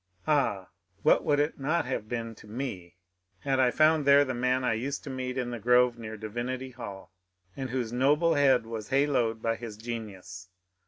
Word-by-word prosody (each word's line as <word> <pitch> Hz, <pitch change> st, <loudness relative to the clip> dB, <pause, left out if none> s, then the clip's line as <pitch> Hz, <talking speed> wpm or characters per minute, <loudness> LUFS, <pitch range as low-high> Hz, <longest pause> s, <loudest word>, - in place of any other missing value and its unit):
Ah, 135 Hz, -11 st, +1 dB, 0.3 s
what -, -, +4 dB
would 145 Hz, -1 st, +2 dB
it 150 Hz, +1 st, 0 dB
not 150 Hz, +3 st, 0 dB
have 115 Hz, -4 st, -4 dB
been 115 Hz, -2 st, -3 dB
to 105 Hz, -, -16 dB
me 105 Hz, -7 st, -6 dB, 0.5 s
had 135 Hz, -1 st, 0 dB
I 130 Hz, -1 st, +5 dB
found 155 Hz, +3 st, +3 dB
there 140 Hz, +1 st, +6 dB
the 130 Hz, -, -3 dB
man 125 Hz, +1 st, 0 dB
I 120 Hz, -, +2 dB
used 135 Hz, +6 st, -3 dB
to 140 Hz, -, -6 dB
meet 130 Hz, 0 st, -4 dB
in 125 Hz, -1 st, -2 dB
the 120 Hz, -, -5 dB
grove 125 Hz, +1 st, +3 dB
near 110 Hz, -1 st, -7 dB
Divinity 120 Hz, +4 st, -4 dB
Hall, 100 Hz, -7 st, -9 dB, 0.4 s
and 135 Hz, -1 st, -4 dB
whose 120 Hz, -2 st, -3 dB
noble 150 Hz, +6 st, +3 dB
head 135 Hz, -5 st, +4 dB
was 110 Hz, -2 st, -6 dB
haloed 135 Hz, -5 st, +1 dB
by 115 Hz, 0 st, +1 dB
his 115 Hz, -3 st, -8 dB
genius 100 Hz, -5 st, -7 dB
125 Hz, 190 wpm, -28 LUFS, 115-135 Hz, 0.5 s, there